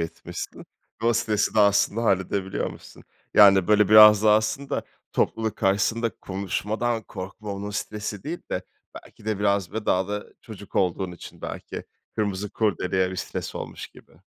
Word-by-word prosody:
etmişsin 80 0 -6 0.4
ve 115 - +1
o 120 - +5
stresi 110 -2 0
de 110 - +5
aslında 100 +2 +3
halledebiliyormuşsun. 95 -1 -2 0.3
Yani, 100 -2 +7
böyle 105 0 +5
biraz 105 -1 +9
da 110 -1 +6
aslında 110 +6 0 0.3
topluluk 110 -2 0
karşısında 110 +4 +1
konuşmadan 105 +4 -2
korkma, 100 +2 -7
onun 100 +1 -5
stresi 105 -1 -4
değil 170 +4 -4
de 90 - -2 0.3
belki - - -13
de 110 -2 -1
biraz 100 -3 +1
ve 110 0 -4
daha 95 +1 +2
da 105 0 -3 0.2
çocuk 105 -4 -12
olduğun 90 0 0
için 85 - -12
belki - - -6 0.3
kırmızı 105 -1 -2
kurdeleye 95 -3 0
bir 95 - -6
stres - - -5
olmuş - - -6
gibi. - - -19
105 Hz, 150 wpm, -25 LUFS, 95-110 Hz, 0.4 s, biraz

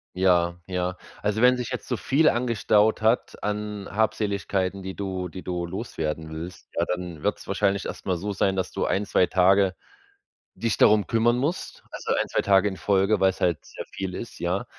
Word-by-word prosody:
Ja, 90 -2 +3
ja. 90 0 -2 0.2
Also, 105 +1 0
wenn 125 +1 +6
sich 125 -2 -4
jetzt 125 - -5
so 125 - 0
viel 150 +7 +3
angestaut 110 -3 +2
hat 110 +3 +1
an 105 -1 -3
Habseligkeiten, 100 -2 0
die 95 0 -6
du 95 -2 -3
die 90 +2 -9
du 90 -1 -3
loswerden 80 -5 -4
willst, 85 +3 -8
ja, 85 - +2
dann 90 -3 -4
wird's - - -2
wahrscheinlich 100 -1 +1
erstmal 90 -2 -3
so 100 +4 -3
sein, 95 0 +1
dass 95 -1 -2
du - - -1
1, 100 +2 0
2 90 -2 +3
Tage 95 +1 +4 0.8
dich 115 -2 -1
darum 105 -1 +5
kümmern 120 +1 +2
musst. 150 +8 -3
Also - - -2
1, - - 0
2 - - +1
Tage 100 0 +4
in 95 -2 -3
Folge, 100 +3 +2
weil's 95 -1 +2
halt 85 -4 +1
sehr - - -9
viel 95 -1 -4
ist, 115 - -7
ja. 90 +3 -1
95 Hz, 185 wpm, -25 LUFS, 90-105 Hz, 0.8 s, wenn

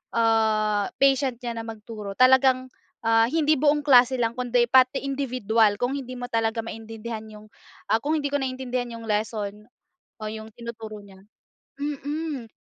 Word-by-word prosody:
ah 215 -2 +2
patient 270 -2 +2
niya 235 -1 -4
na 225 - -7
magturo, 215 -2 -7
talagang 255 0 +4 0.3
ah 225 0 +4
hindi 310 0 +2
buong 295 0 +3
klase 255 -2 +6
lang 235 -2 0
kundi 245 0 +1
pati 260 +1 +4
individual 240 -6 +1
kung 245 +5 -1
hindi 255 -1 -8
mo 245 0 -7
talaga 225 0 0
maintindihan 225 0 -7
yung 215 0 -14 0.4
ah 220 - +4
kung 300 +6 -1
hindi 285 -2 -1
ko 285 - +1
naiintindihan 255 -2 -3
yung 230 - -9
lesson 210 -1 -3 0.5
o - - -14
yung 220 +1 -7
tinuturo 225 -2 -8
niya 195 -2 -15 0.6
mm. 290 -2 -4
235 Hz, 150 wpm, -25 LUFS, 220-260 Hz, 0.6 s, klase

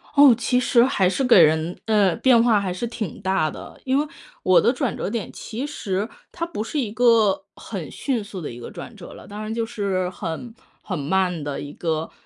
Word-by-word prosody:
哦， 285 -3 +8
其 250 +1 +1
实 240 -1 +4
还 190 -8 +2
是 270 - -1
给 240 -8 +7
人 160 +2 +3
呃， 205 -5 +3
变 250 -3 +5
化 220 -4 +4
还 185 -2 -2
是 185 +7 -3
挺 225 -6 -5
大 190 -5 +1
的。 - - -10
因 265 0 +1
为 295 +1 +1 0.4
我 185 -1 +5
的 240 - +4
转 260 -4 -2
折 - - -3
点 230 -3 -4
其 235 +6 -5
实， 205 -8 -3 0.2
它 335 - -3
不 220 -11 -4
是 295 +6 -3
一 225 -6 -2
个 225 -3 +3
很 - - -7
迅 250 -7 -2
速 200 -2 -8
的 150 - -5
一 120 - -9
个 - - -8
转 - - -9
折 - - -11
了， - - -13
当 205 +1 -7
然 215 +1 -5
就 230 0 -1
是 190 -4 -1
很 190 +7 -6 0.3
很 185 - -3
慢 180 +1 0
的 145 -1 -4
一 145 0 -7
个 160 -1 -2
205 Hz, 235 characters per minute, -23 LUFS, 180-240 Hz, 0.4 s, 哦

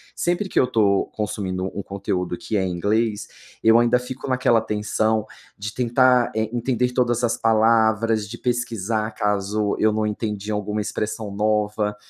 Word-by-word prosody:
sempre 175 +3 0
que - - +1
eu 130 - +3
tô 100 -4 +2
consumindo 95 -3 -3
um 100 - -2
conteúdo 90 -3 -3
que 110 - -4
é 95 - +2
em 95 - -1
inglês, 105 +4 0 0.4
eu 115 +1 +6
ainda 120 +1 +4
fico 125 +2 -7
naquela 125 -3 +3
tensão 110 0 0 0.3
de 105 +2 -5
tentar, 125 0 +3
eh, 110 0 0
entender 125 +1 0
todas 120 -1 +1
as 115 - +2
palavras, 110 -1 +2
de 120 - -7
pesquisar 115 -3 -1
caso 105 0 0
eu 110 - +4
não 110 0 0
entendi 105 -1 -3
alguma 105 0 -2
expressão 105 0 -4
nova. 105 0 0
110 Hz, 160 wpm, -22 LUFS, 105-115 Hz, 0.4 s, eu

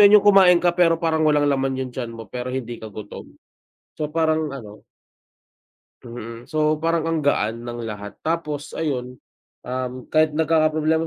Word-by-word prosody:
'yun 205 +1 +9
'yung 205 - +3
kumain 195 -3 +7
ka 175 0 +2
pero 170 -1 +3
parang 160 -1 0
walang 150 -1 +3
laman 135 -2 +1
'yung 130 -1 -4
tiyan 120 -2 -4
mo, 115 -1 -8
pero 125 0 -4
hindi 120 -2 -5
ka 110 - -7
gutom? 105 0 -9 0.7
So 150 - -1
parang 155 -2 0
ano 105 -5 -10 1.2
Mm, 115 0 -9
so 155 0 +2
parang 165 -1 +1
ang 165 0 0
gaan 115 -5 0
ng 120 -1 -6
lahat. 105 -2 -7
Tapos 150 -3 -2
ayun, 125 -5 -3 0.4
um, 125 0 -3 0.2
kahit 155 -1 +3
nagkakaproblema 160 0 +2
150 Hz, 165 wpm, -22 LUFS, 120-160 Hz, 1.2 s, yun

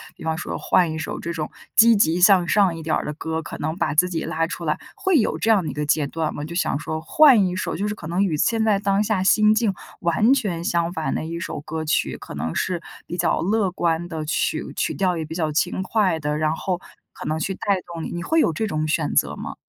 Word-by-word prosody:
比 - - -12
方 160 0 -1
说 175 - -4
换 175 -3 +2
一 160 - -4
首 - - -4
这 170 - -4
种 155 -2 -4 0.3
积 230 0 +7
极 180 -4 +2
向 185 -2 +6
上 190 -3 +3
一 160 - -8
点 155 - 0
儿 - - -1
的 - - -3
歌， 160 +1 -3
可 165 - -8
能 155 +2 -3
把 155 -5 -1
自 180 +4 +5
己 170 -3 -3
拉 165 0 -1
出 170 0 -6
来， 155 -1 0 0.2
会 380 -4 +2
有 230 - +1
这 225 - 0
样 210 -4 +4
的 155 - -3
一 - - -8
个 150 +2 -3
阶 150 0 +2
段 155 +2 -2
吗？ 145 - -5
就 165 - -8
想 170 -5 0
说 155 +1 -4
换 235 - +5
一 180 - -3
首 185 - -3
就 200 +5 -2
是 210 - -3
可 170 - -11
能 175 +5 0
与 170 -6 0
现 225 +8 +1
在 215 -2 +3
当 200 +1 +1
下 210 -3 0
心 215 +2 +4
境 215 -3 +1 0.3
完 175 +8 +3
全 195 -10 -2
相 170 0 0
反 160 -3 -2
的 - - -3
一 165 +1 -5
首 170 - -5
歌 160 +1 -5
曲， 155 - 0
可 - - -9
能 80 - -3
是 180 -2 -1 0.3
比 175 - -5
较 175 - +1
乐 200 +1 +1
观 170 -1 -1
的， 160 -2 -5
曲 155 - -1
曲 - - -1
调 185 -2 0
也 160 - -2
比 155 +1 -7
较 160 -3 -1
轻 175 +4 0
快 190 -4 +1
的， 150 0 -2
然 155 0 +1
后 180 +2 -2 0.3
可 - - -9
能 155 +1 -1
去 195 +5 -2
带 200 0 0 0.2
动 165 -1 -5
你。 - - -4
你 175 - -4
会 320 - +1
有 - - +2
这 215 +8 -2
种 155 -5 -1
选 150 -1 0
择 - - +2
吗？ - - -6
170 Hz, 285 characters per minute, -22 LUFS, 160-195 Hz, 0.3 s, 积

